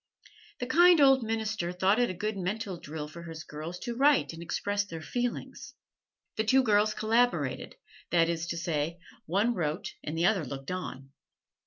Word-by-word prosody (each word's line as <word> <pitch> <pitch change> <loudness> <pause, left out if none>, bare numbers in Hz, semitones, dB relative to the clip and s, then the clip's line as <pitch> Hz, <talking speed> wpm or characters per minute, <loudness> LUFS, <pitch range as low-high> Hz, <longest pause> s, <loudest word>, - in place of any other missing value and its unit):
The 245 - -3
kind 345 +6 +6
old 270 -2 +6
minister 220 -5 -2
thought 190 +5 +2
it 245 - +3
a 185 - -4
good 210 +4 -2
mental 195 +1 -3
drill 150 -1 -6
for 170 +3 -10
his 165 -1 -8
girls 155 +4 -7
to 240 -2 -4
write 280 - +3
and 165 - -9
express 205 +4 -1
their 165 -5 -8
feelings. 245 - -4 0.6
The 220 - +2
two 260 +4 +4
girls 215 -1 +3
collaborated 215 - +1 0.3
that 165 -1 +3
is 170 0 -2
to 170 - -3
say, 165 -1 -2 0.3
one 205 +8 +2
wrote 155 -5 -3
and 155 +2 -4
the 170 - +2
other 195 -4 +3
looked 135 +2 -6
on. 135 -7 -6
185 Hz, 175 wpm, -29 LUFS, 165-225 Hz, 0.6 s, kind